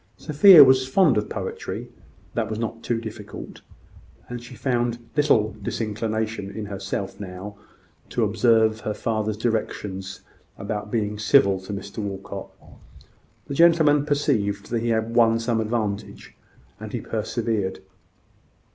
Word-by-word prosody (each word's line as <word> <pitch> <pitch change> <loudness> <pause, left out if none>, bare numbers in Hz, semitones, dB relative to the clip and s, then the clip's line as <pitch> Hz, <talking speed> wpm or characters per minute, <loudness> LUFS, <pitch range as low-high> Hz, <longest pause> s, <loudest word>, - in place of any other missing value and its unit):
Sophia 155 +2 +8
was 130 -1 +4
fond 150 -1 +4
of 105 0 -1
poetry - - -5 0.5
that - - -1
was 110 - -3
not 115 0 -4
too 120 -1 -1
difficult; 105 -2 -9 0.7
and 120 -1 -6
she 125 +1 -11
found 120 -1 -1 0.2
little 130 -8 +2
disinclination 110 -1 -3
in 105 +2 -6
herself 100 -1 -5
now 100 +1 -7 0.5
to 120 - 0
observe 110 +1 +3
her 105 -1 -4
father's 110 -1 -2
directions 105 -4 -3 0.4
about 105 +1 -4
being 105 -2 -2
civil 100 -4 +4
to 95 +2 -9
Mr 100 +1 -6
Walcot. 100 -1 -6 1.0
The - - -6
gentleman 155 -2 +5
perceived 115 -9 0
that 120 - +1
he 120 +1 -2
had 110 0 0
won 115 -1 +4
some 115 -1 0
advantage; 110 -2 -4 0.4
and - - -8
he - - -2
persevered. 100 -5 -2
110 Hz, 130 wpm, -24 LUFS, 105-120 Hz, 1.0 s, Sophia